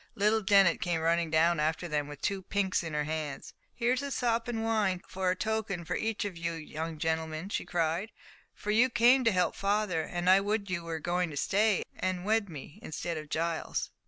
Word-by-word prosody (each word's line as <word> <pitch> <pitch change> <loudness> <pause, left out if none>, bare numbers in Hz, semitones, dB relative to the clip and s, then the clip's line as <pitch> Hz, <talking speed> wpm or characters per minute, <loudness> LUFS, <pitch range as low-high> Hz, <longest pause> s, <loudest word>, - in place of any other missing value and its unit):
Little 210 +2 +3
Dennet 195 -3 +4
came 175 -2 0
running 165 +1 +1
down 165 +1 +3
after 160 +3 0
them 150 -2 -1
with 145 -1 -10
two 195 -1 0
pinks 190 0 0
in 165 -3 -5
her 150 - +1
hands. 150 -2 -4 0.2
"Here's 250 +2 +1
a 280 - -4
sop 235 -3 0
in 225 -2 -2
wine 210 -5 +1
for 185 -1 -1
a 180 - +2
token 215 -4 -2
for - - -2
each 220 -2 -1
of 200 -3 -4
you 170 0 -2
young 160 0 -5
gentlemen," 160 +2 -2
she - - -2
cried, 175 +5 -1 0.4
"for 210 - -3
you 235 +4 +4
came 240 +2 +5
to 230 - +5
help 180 -2 +1
father, 200 -4 0
and 175 +2 -4
I 190 +1 +7
would 205 -1 -1
you 175 -2 -1
were 165 -1 -3
going 175 +2 0
to 145 - -7
stay 205 +5 +2
and 185 -1 -2
wed 215 -1 +1
me 150 -2 -10
instead 165 +2 -4
of 155 -1 -7
Giles." 165 +1 -2
180 Hz, 210 wpm, -30 LUFS, 160-210 Hz, 0.4 s, I